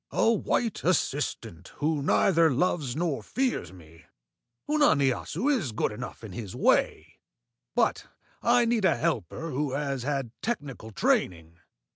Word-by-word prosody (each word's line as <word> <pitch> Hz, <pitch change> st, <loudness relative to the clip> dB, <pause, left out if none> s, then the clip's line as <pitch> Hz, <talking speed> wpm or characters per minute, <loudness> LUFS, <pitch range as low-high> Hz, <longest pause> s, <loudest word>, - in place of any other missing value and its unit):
"A 230 Hz, -, +3 dB
white 225 Hz, 0 st, -1 dB
assistant 135 Hz, -, -1 dB
who 150 Hz, 0 st, 0 dB
neither 165 Hz, +3 st, +4 dB
loves 145 Hz, -2 st, 0 dB
nor 160 Hz, -3 st, -1 dB
fears 250 Hz, -, -2 dB
me. 85 Hz, -3 st, -16 dB, 0.6 s
Unani 160 Hz, -, +4 dB
Assu 245 Hz, -, -4 dB
is 165 Hz, -, -2 dB
good 105 Hz, -, 0 dB
enough 120 Hz, +2 st, -8 dB
in 110 Hz, -, -8 dB
his 100 Hz, 0 st, -7 dB
way, -, -, +1 dB, 0.6 s
but -, -, +1 dB, 0.3 s
I 240 Hz, 0 st, +4 dB
need 230 Hz, -2 st, +1 dB
a 185 Hz, -, +3 dB
helper 165 Hz, 0 st, -2 dB
who 140 Hz, 0 st, -2 dB
has 140 Hz, -2 st, -2 dB
had 135 Hz, -2 st, -2 dB
technical 145 Hz, -, -4 dB
training." 85 Hz, -5 st, 0 dB
145 Hz, 135 wpm, -27 LUFS, 115-180 Hz, 0.6 s, neither